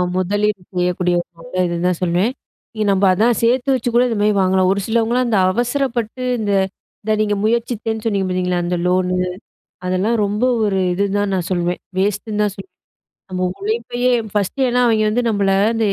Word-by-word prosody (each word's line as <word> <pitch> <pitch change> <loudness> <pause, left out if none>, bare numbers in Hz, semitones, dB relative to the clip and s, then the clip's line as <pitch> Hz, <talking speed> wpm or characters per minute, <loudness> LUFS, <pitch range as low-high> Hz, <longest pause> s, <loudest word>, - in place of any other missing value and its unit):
முதலீடு 200 +2 0
செய்யக்கூடிய 180 0 +1
ஒரு - - -16
நல்ல 165 +2 -8
இதுன்னு 175 0 -1
தான் 180 -2 0
சொல்லுவேன். 180 +7 +1 0.5
இ 215 - -2
நம்ம 195 0 +2
அதான் 225 +5 +2
சேர்த்து 250 +3 +2
வச்சு 245 -1 -1
கூட 240 - +5
இந்த 230 -3 -2
மாதிரி 210 0 +3
வாங்கலாம். 185 0 +3
ஒரு 200 - 0
சிலவங்கல்லாம், 235 +2 +1
அந்த 220 -4 +2 0.2
அவசரப்பட்டு 245 0 -1 0.2
இந்த 210 -2 -1 0.5
இத 215 - -1
நீங்க 210 -1 +1
முயற்சித்தேன்னு 225 -1 -1
சொன்னீங்க 200 -3 0
பார்த்தீங்களா? 180 -1 0
அந்த 175 +1 -1
லோனு 180 0 +1 0.7
அதெல்லாம் 190 +6 +1
ரொம்ப 205 +4 0 0.2
ஒரு 200 -2 +1
இதுன்னு 200 +2 0
தான் 205 -1 0
நான் 180 -3 -1
சொல்லுவேன். 175 -1 -1 0.2
வேஸ்ட்டுன்னு 210 +2 -1
தான் 205 - -1
சொல்லுவேன். 380 - -12 0.5
நம்ம 185 0 -1
உழைப்பையே 390 - -1 0.2
ஃபர்ஸ்ட்டு 210 +6 0
ஏன்னா 250 +1 +1
அவங்க 220 -2 +3
வந்து 240 +3 +1
நம்மள, 200 -3 +1 0.2
வந்து 225 -2 0
205 Hz, 175 wpm, -19 LUFS, 185-230 Hz, 0.7 s, கூட